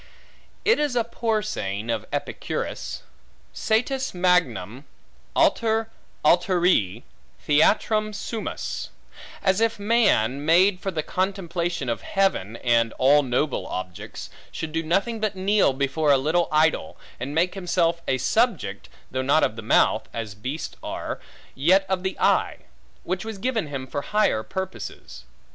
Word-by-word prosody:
It 435 Hz, -, +4 dB
is 295 Hz, -4 st, 0 dB
a 235 Hz, -, +3 dB
poor 225 Hz, -2 st, -1 dB
saying 105 Hz, -, -3 dB
of 115 Hz, -2 st, -3 dB
Epicurus, -, -, -4 dB, 0.5 s
Satis 250 Hz, +2 st, 0 dB
magnum 140 Hz, -, +1 dB, 0.5 s
alter 225 Hz, -1 st, +2 dB, 0.3 s
alteri 175 Hz, -, +3 dB, 0.4 s
theatrum 215 Hz, +8 st, +2 dB
sumus; 215 Hz, +1 st, -4 dB, 0.5 s
as 190 Hz, +2 st, +2 dB
if 230 Hz, 0 st, +2 dB
man, 200 Hz, -, +2 dB
made 180 Hz, +5 st, +4 dB
for 195 Hz, -, -3 dB
the 160 Hz, -5 st, -2 dB
contemplation 175 Hz, -4 st, -2 dB
of 115 Hz, -, -2 dB
heaven, 190 Hz, -, 0 dB
and 115 Hz, -2 st, +3 dB
all 140 Hz, +3 st, +5 dB
noble 130 Hz, +2 st, -1 dB
objects, 90 Hz, -1 st, -6 dB, 0.2 s
should 160 Hz, -, -5 dB
do 165 Hz, +1 st, -1 dB
nothing 195 Hz, +8 st, 0 dB
but 215 Hz, -2 st, -1 dB
kneel 195 Hz, -2 st, +3 dB
before 140 Hz, +3 st, +1 dB
a 140 Hz, -, +6 dB
little 160 Hz, +6 st, +1 dB
idol, 155 Hz, -, +2 dB, 0.2 s
and 135 Hz, +4 st, -4 dB
make 175 Hz, +3 st, +2 dB
himself 175 Hz, -3 st, 0 dB
a 130 Hz, -, +2 dB
subject, -, -, 0 dB, 0.2 s
though 130 Hz, -, -1 dB
not 140 Hz, +4 st, +3 dB
of 110 Hz, -, +1 dB
the 110 Hz, -, -6 dB
mouth 110 Hz, 0 st, +2 dB
(as 110 Hz, -3 st, -4 dB
beasts 130 Hz, +10 st, -5 dB
are), -, -, -5 dB, 0.3 s
yet 185 Hz, +8 st, +3 dB
of 190 Hz, -1 st, 0 dB
the 190 Hz, 0 st, -3 dB
eye; -, -, +2 dB, 0.5 s
which 185 Hz, +1 st, -2 dB
was 220 Hz, -2 st, -6 dB
given 225 Hz, -4 st, -1 dB
him 135 Hz, -2 st, -5 dB
for 145 Hz, +2 st, -4 dB
higher 210 Hz, -, +1 dB
purposes. 190 Hz, -, -7 dB
170 Hz, 140 wpm, -24 LUFS, 130-200 Hz, 0.5 s, a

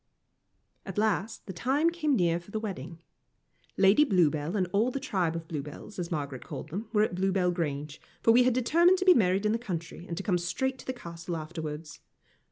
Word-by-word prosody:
At -, -, -8 dB
last 215 Hz, 0 st, 0 dB
the 190 Hz, -, -6 dB
time 275 Hz, -, +1 dB
came 305 Hz, -5 st, +1 dB
near 170 Hz, -5 st, +2 dB
for 175 Hz, -, -17 dB
the 220 Hz, -, -3 dB
wedding. 170 Hz, -6 st, -6 dB, 0.7 s
Lady 195 Hz, +9 st, +6 dB
Bluebell 165 Hz, -, +2 dB
and 185 Hz, -, +2 dB
all 215 Hz, +5 st, +3 dB
the 275 Hz, -, -3 dB
tribe 180 Hz, -9 st, -1 dB
of 165 Hz, -1 st, -5 dB
Bluebells, 150 Hz, +6 st, -7 dB
as 170 Hz, -1 st, -3 dB
Margaret 140 Hz, -6 st, -4 dB
called -, -, -7 dB
them, 205 Hz, +7 st, -5 dB
were 210 Hz, -2 st, +3 dB
at 215 Hz, -, -1 dB
Bluebell 185 Hz, 0 st, +1 dB
Grange, 150 Hz, -3 st, -3 dB, 0.2 s
for 230 Hz, -, +6 dB
we 240 Hz, +2 st, +6 dB
had 250 Hz, -1 st, +3 dB
determined 340 Hz, +9 st, +4 dB
to 375 Hz, -, -2 dB
be 370 Hz, -, +9 dB
married 195 Hz, -, +2 dB
in 210 Hz, -, +3 dB
the 230 Hz, -, 0 dB
country, 170 Hz, -5 st, -6 dB
and 170 Hz, -, -5 dB
to 195 Hz, -, -3 dB
come 180 Hz, -3 st, +1 dB
straight 260 Hz, +10 st, -2 dB
to -, -, -12 dB
the -, -, 0 dB
Castle 170 Hz, -6 st, -6 dB
afterwards. 155 Hz, -1 st, -6 dB
185 Hz, 205 wpm, -29 LUFS, 165-230 Hz, 0.7 s, be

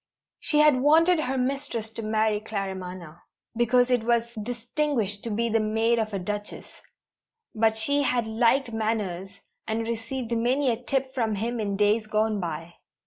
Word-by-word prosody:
She 315 Hz, -2 st, 0 dB
had 300 Hz, -4 st, +5 dB
wanted 325 Hz, +4 st, +5 dB
her 265 Hz, -3 st, -1 dB
mistress 250 Hz, -4 st, -2 dB
to 225 Hz, -, -6 dB
marry 215 Hz, -1 st, +1 dB
Claremanagh, 185 Hz, -5 st, -6 dB, 0.4 s
because 245 Hz, +2 st, +3 dB
it 245 Hz, -3 st, +2 dB
was 235 Hz, 0 st, +1 dB
distinguished 235 Hz, -1 st, -2 dB
to 230 Hz, -, -4 dB
be 230 Hz, +2 st, 0 dB
the 225 Hz, 0 st, +2 dB
maid 225 Hz, +2 st, +1 dB
of 220 Hz, -1 st, -1 dB
a 200 Hz, -, -2 dB
Duchess, 205 Hz, +3 st, -6 dB, 0.7 s
but 220 Hz, 0 st, +2 dB
she 285 Hz, +6 st, +3 dB
had 250 Hz, -4 st, +1 dB
liked 235 Hz, +3 st, +2 dB
Manners 200 Hz, -4 st, -3 dB, 0.3 s
and 220 Hz, +1 st, -1 dB
received 235 Hz, +2 st, -4 dB
many 250 Hz, +3 st, +2 dB
a 225 Hz, -, -4 dB
tip 265 Hz, -1 st, -1 dB
from 225 Hz, -5 st, 0 dB
him 230 Hz, +4 st, -2 dB
in 200 Hz, -2 st, -2 dB
days 210 Hz, +2 st, +2 dB
gone 215 Hz, 0 st, 0 dB
by. 165 Hz, -1 st, -5 dB
225 Hz, 160 wpm, -26 LUFS, 210-250 Hz, 0.7 s, had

